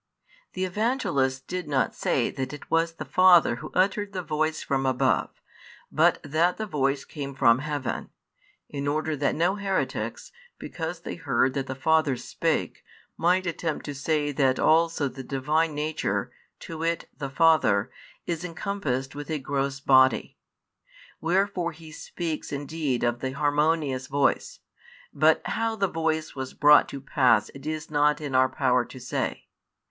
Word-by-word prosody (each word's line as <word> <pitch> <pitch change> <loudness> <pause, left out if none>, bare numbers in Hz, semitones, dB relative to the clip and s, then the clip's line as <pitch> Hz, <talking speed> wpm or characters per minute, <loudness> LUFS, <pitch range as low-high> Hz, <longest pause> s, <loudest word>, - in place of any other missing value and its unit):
The 185 0 -1
Evangelist 175 - 0
did 180 -3 -4
not 140 -3 0
say - - 0
that 130 +1 -4
it 145 - -11
was 165 0 +2
the - - -7
Father 180 -9 +5
Who 155 +4 -8
uttered 200 +2 +1
the 185 -2 -3
voice 155 0 -1
from 135 -2 -1
above, 130 0 +1 0.6
but - - +3
that 160 +5 +1
the 220 - -3
voice 140 -6 -1
came 140 -3 -7
from 130 -3 +4
heaven; 145 -2 -4 0.6
in 140 -1 -4
order 155 +1 0
that 140 0 0
no 175 +5 +1
heretics, 195 -2 -3 0.3
because - - -6
they - - -6
heard 130 - +1
that 135 0 -3
the 130 - -4
Father 155 -1 +2
spake, - - -2 0.3
might 180 +3 +2
attempt 165 -2 -3
to 145 - -4
say 145 +1 -1
that 135 -2 +2
also 160 -2 +3
the 135 0 -8
Divine 150 +4 0
Nature, 150 +1 -2 0.3
to 165 -1 -7
wit, 165 0 -1
the 140 -2 -5
Father, 150 -9 +3 0.3
is 170 -1 -3
encompassed 160 -7 -3
with 145 +1 -8
a 155 - -1
|155 140 - -10
gross 140 0 -2
body. 130 -2 +4 0.8
Wherefore 180 0 0
he 160 0 -13
speaks 160 0 -5
indeed 145 -2 -2
of 120 0 0
the 130 0 -3
harmonious 145 -2 0
voice, 140 0 0 0.5
but 155 +1 +3
how 225 0 -1
the 200 -2 +1
voice 160 -2 -2
was 130 -1 -6
brought 150 0 +6
to 140 - -7
pass 130 -5 +3
it 140 +2 -11
is 155 0 -4
not 150 0 +3
in 145 -3 -5
our 130 0 +4
power 125 -4 +2
to 130 - -11
say. 125 - -3
150 Hz, 160 wpm, -26 LUFS, 135-165 Hz, 0.8 s, brought